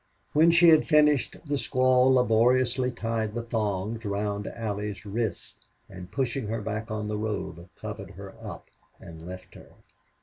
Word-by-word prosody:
When 160 +3 +6
she 170 0 +7
had 160 -1 +5
finished 150 -4 +3
the 145 -1 -1
squaw 130 -1 +3
laboriously 125 +1 +3
tied 115 -2 -3
the 120 - -2
thongs 110 -1 -2
round 100 0 -2
Allie's 105 -2 -4
wrists, 105 -2 -4 0.2
and, 90 0 -10
pushing 130 -3 -2
her 115 +2 -2
back 110 +1 -4
on 105 -1 -3
the 105 0 -2
robe, 95 -5 -4
covered - - -7
her - - -9
up - - -8 0.3
and 80 0 -11
left 90 0 -9
her. - - -15
110 Hz, 155 wpm, -27 LUFS, 105-130 Hz, 0.3 s, she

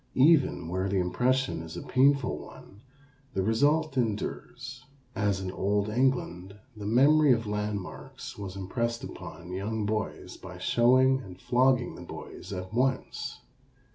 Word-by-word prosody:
Even 135 - +4
where 95 +3 -1
the 100 - +1
impression 100 0 +1
is 80 -1 -8
a - - -5
painful 135 0 +3
one 100 - -13 0.5
the 95 - +1
result 145 +7 +2
endures; 125 +3 -3 0.3
as 100 -2 +1
in 95 -1 -4
old 100 +2 0
England 105 -6 0 0.2
the 105 -1 -6
memory 140 +6 +5
of 115 -1 -1
landmarks 105 -2 -4
was 100 -2 -7
impressed 115 +5 -2
upon 85 +2 -8
young 105 +3 -2
boys 110 0 -3
by - - -10
showing 130 +2 +4
and 95 -6 -11
flogging 125 +1 +2
the - - -10
boys - - -9
at 95 +1 -5
once. 130 +2 -1
110 Hz, 140 wpm, -28 LUFS, 95-130 Hz, 0.5 s, memory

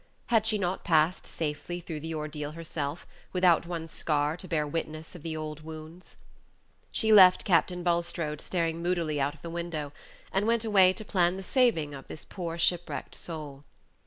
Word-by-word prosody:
Had 220 -2 +3
she 220 -1 +2
not 185 -1 -2
passed 165 0 +2
safely 160 +3 -3
through 165 -3 -6
the 160 +2 -5
ordeal 150 -1 -4
herself, 160 -2 -4 0.3
without 180 -2 +4
one 165 -2 -4
scar 150 -1 0
to 180 +2 -8
bear 155 -4 0
witness 155 +1 -4
of 175 - -10
the 160 0 -4
old 155 -1 -5
wounds? 160 +3 -10 0.7
She 220 -1 +2
left 185 -3 +8
Captain 180 -1 +2
Bulstrode 170 -3 -1
staring 165 -2 -1
moodily 170 -4 0
out 145 +2 0
of 150 - -21
the 170 - -5
window, 165 -4 -4 0.4
and 195 +3 +1
went 230 -1 +2
away 195 -4 +6
to 215 +3 -7
plan 180 -2 +2
the 195 - -6
saving 190 - +2
of 135 -1 -9
this 155 - -8
poor 170 -3 -5
shipwrecked 175 0 0
soul. 150 -4 -6
165 Hz, 175 wpm, -29 LUFS, 155-180 Hz, 0.7 s, left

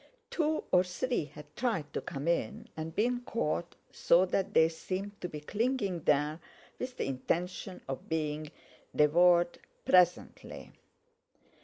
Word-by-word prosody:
Two 310 -1 0
or 180 0 +6
three 185 - -2
had 150 +1 -14
tried 185 - -1
to - - -2
come 140 +3 -5
in, 210 +6 -1
and 160 +1 -6
been 245 +3 +1
caught, 175 -8 -2 0.2
so 175 +2 +4
that 195 +2 -1
they 160 - +7
seemed 190 +5 -5
to 180 - -3
be 150 - -6
clinging 210 - -1
there 150 +2 +2 0.4
with 255 0 -5
the - - -1
intention 175 +8 -3
of 135 -1 -6
being 155 -1 -2 0.5
devoured 175 +3 +4 0.3
presently. 180 -1 +2
175 Hz, 135 wpm, -31 LUFS, 155-205 Hz, 0.5 s, they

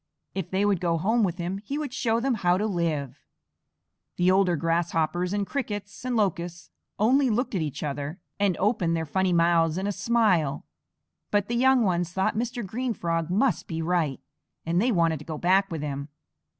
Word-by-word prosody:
If 190 -4 -4
they 195 +2 +1
would 200 -4 +1
go 170 -2 +1
home 220 +8 +2
with 180 -3 0
him, 180 +2 -3
he 245 +8 -5
would 295 -4 -4
show 230 -3 +1
them 265 +2 +1
how 180 -5 +2
to 210 - 0
live." 155 - -2 1.0
The 180 +1 +4
older 190 -2 +3
Grasshoppers 165 +1 0
and 205 0 0
Crickets 205 -6 -5
and 250 -1 -1
Locusts 175 -5 -1 0.3
only 260 +5 +3
looked 240 +3 0
at 185 - 0
each 150 -1 -4
other 145 +4 -4 0.2
and 200 -3 +2
opened 185 -5 +1
their 160 - -2
funny 185 +5 0
mouths 170 -1 +3
in 190 - -2
a 205 - 0
smile, 200 -8 +1 0.6
but 205 0 +1
the 240 - 0
young 260 0 +4
ones 175 -3 0
thought 190 +1 0
Mr. 240 0 -2
Green 235 +4 -2
Frog 165 -1 -1
must 215 +8 +1
be 165 -5 -4
right, 165 -4 0 0.5
and 170 +2 +1
they 245 +3 +2
wanted 165 -5 +2
to - - -10
go 155 -2 -5
back 190 +4 +3
with 160 -4 -4
him. 140 0 -4
185 Hz, 190 wpm, -26 LUFS, 165-215 Hz, 1.0 s, The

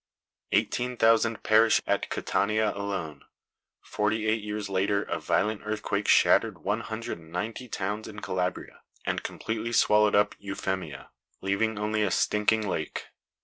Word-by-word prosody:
Eighteen 125 0 0
thousand 115 0 +3
perished 110 +1 +4
at - - 0
Catania 110 +1 +1
alone. 95 -8 -4 0.6
Forty 110 +1 -1
eight 110 0 +1
years 105 0 -4
later 100 +1 +1
a - - -3
violent 105 +1 0
earthquake 105 -1 -2
shattered - - +4
one 105 +3 0
hundred 110 -4 -5
and 80 -1 -16
ninety 110 +8 -4
towns 105 0 -3
in 105 -1 -8
Calabria 90 -2 -3 0.2
and - - -1
completely 110 +1 -4
swallowed 105 -2 +4
up 105 0 +3
Eufemia, 95 -7 -4 0.3
leaving 100 +3 0
only 105 +1 0
a 105 - +2
stinking 105 +3 +1
lake. 80 -5 -4
105 Hz, 140 wpm, -27 LUFS, 100-110 Hz, 0.6 s, perished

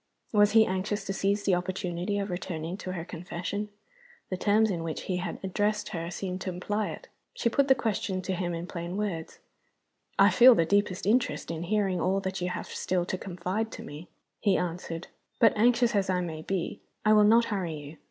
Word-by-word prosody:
Was 205 0 +5
he 220 -1 +7
anxious 195 +2 -2
to 195 - -2
seize 200 +1 0
the 195 - +2
opportunity 180 +1 -2
of 200 -1 -2
returning 175 -1 -4
to 185 -2 -5
her 170 -2 -5
confession? 180 +4 -5 0.6
The - - +1
terms 210 +3 +3
in 170 -3 -2
which 165 -1 -4
he 185 - -2
had 180 -1 -4
addressed 205 +2 0
her 170 -4 -4
seemed 185 +1 -4
to - - -3
imply 205 +4 -2
it. - - -8 0.3
She 235 - +1
put 275 +4 +2
the 265 - +6
question 195 -5 -2
to 190 +1 -2
him 175 -1 -2
in 165 +1 -4
plain 175 +1 -5
words, 190 -6 -3 0.8
"I - - +6
feel 250 0 +8
the 165 - +3
deepest 200 0 +1
interest 225 -3 +1
in 165 -1 -4
hearing 190 -1 0
all 190 +2 +2
that 190 -1 -3
you 180 - 0
have 180 - -4
still 180 -1 -1
to 185 - -2
confide 190 +4 -3
to - - -7
me," 150 +4 -9 0.3
he 200 -3 +3
answered. 170 -1 -4 0.3
"But 225 -3 +5
anxious 240 +2 +4
as 195 -2 +1
I 185 -1 +2
may 160 -3 -4
be, 190 +4 -3 0.2
I 215 - +6
will 210 -1 +7
not 230 +3 +6
hurry 175 -5 -2
you. 150 +1 -9
190 Hz, 205 wpm, -28 LUFS, 175-210 Hz, 0.8 s, feel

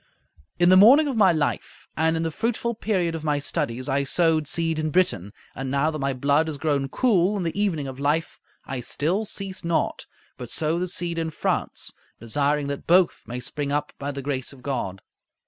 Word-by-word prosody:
In 175 0 +4
the 185 - +7
morning 265 +10 +8
of 275 - -2
my 200 -5 +5
life 155 -3 -2
and 160 +1 +2
in 160 - -1
the 165 - -1
fruitful 235 +5 -1
period 190 -6 -1
of 165 -1 -5
my 150 -2 +1
studies 130 -3 -2
I 140 0 +1
sowed 160 +1 +2
seed 165 0 -1
in 155 0 -1
Britain, 120 - +1 0.2
and 135 0 -5
now 140 +4 +1
that 155 - -5
my 135 0 0
blood 140 +4 +2
has 155 -2 -4
grown 140 -2 0
cool 205 - +2
in 190 - -2
the 165 - -2
evening 165 -9 0
of 130 0 -7
life, 150 +3 0 0.3
I 130 -1 -4
still 165 - -1
cease 195 -2 -5
not; 170 -1 -1 0.3
but 125 -2 -7
sow 160 +2 0
the 180 - -1
seed 170 -2 -3
in 165 -1 -1
France, 160 - -2 0.3
desiring 145 +5 0
that 140 0 -5
both 180 +1 +4
may 120 +1 -4
spring 140 +2 -3
up 145 0 -1
by 140 - -3
the 140 -1 -5
grace 130 -2 -3
of 135 -3 -15
God. 110 -9 -3
155 Hz, 205 wpm, -24 LUFS, 140-175 Hz, 0.3 s, morning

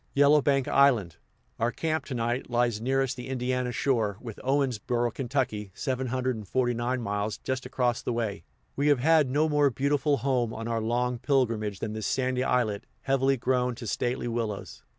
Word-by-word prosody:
Yellowbank 140 -1 +4
Island, 120 - +3 0.4
our 115 +2 +1
camp 160 +2 -2
to 130 - -5
night, 120 +2 -1
lies 120 -3 +1
nearest 135 +1 +1
the 125 0 -7
Indiana 125 -1 -1
shore, 115 -5 0
with 115 -3 -8
Owensboro, 125 -3 0
Ky. 125 -6 -2
(749 125 -1 -1
miles), 105 0 -2
just 130 -1 -3
across 125 -2 0
the - - -2
way. 110 -6 -2 0.3
We 140 +1 +1
have 145 -2 +5
had 150 +1 +4
no 150 +4 +2
more 150 -2 +3
beautiful 140 +2 +1
home 120 -2 0
on 115 +1 -5
our 115 -1 -1
long 120 +2 0
pilgrimage 115 -7 0
than 110 - -3
this 110 -1 -3
sandy 130 -1 0
islet, 115 -6 0
heavily 135 0 +2
grown 125 0 0
to 115 - -8
stately 120 +3 -1
willows. 115 -4 -4
125 Hz, 160 wpm, -28 LUFS, 115-135 Hz, 0.4 s, have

